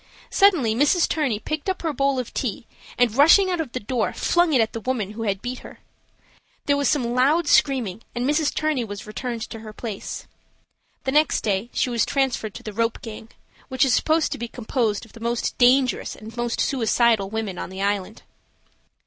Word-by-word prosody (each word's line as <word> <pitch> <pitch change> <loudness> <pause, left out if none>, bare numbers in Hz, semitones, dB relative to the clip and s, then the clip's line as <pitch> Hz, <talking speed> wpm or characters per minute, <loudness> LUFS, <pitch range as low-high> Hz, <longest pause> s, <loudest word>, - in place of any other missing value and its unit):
Suddenly 345 - +4
Mrs. 295 +8 +3
Turney 280 -9 0
picked 310 - -4
up 375 - -3
her 320 -2 -1
bowl 275 -1 +1
of 250 -2 -4
tea, 235 -2 -3 0.3
and, 245 -3 +3
rushing 335 +7 +6
out 350 -2 0
of 285 -7 -6
the 255 - -3
door 230 +1 -1
flung 345 -1 +2
it 265 - +4
at 225 -1 +1
the 230 - -4
woman 225 -5 -2
who 220 +2 -7
had 200 -3 -2
beat 250 +1 -4
her. - - -12 0.9
There 285 - +3
was 285 0 +1
some 245 -6 0
loud 290 +6 +3
screaming 250 -10 +2
and 240 +1 -1
Mrs. 300 +1 +2
Turney 310 -5 0
was 205 -1 -7
returned 230 +1 -5
to 225 - -7
her 215 -1 -10
place. 215 -3 -6 0.8
The 265 - -1
next 300 +2 +3
day 205 +2 -1
she 250 - 0
was 235 -2 +2
transferred 260 -6 -1
to 245 - -9
the 215 -3 -6
"rope 230 +2 0
gang," 220 0 -8 0.4
which 260 -1 +2
is 260 - +2
supposed 315 +3 +2
to - - -4
be 235 - -3
composed 230 -2 -2
of 225 - -20
the 230 - -12
most 235 +1 -2
dangerous 255 +1 +3
and 220 +1 -11
most 240 -1 -2
suicidal 230 -5 +2
women 215 -4 -4
on - - -5
the 190 +1 -5
island. 205 +1 -2
245 Hz, 200 wpm, -23 LUFS, 220-280 Hz, 0.9 s, rushing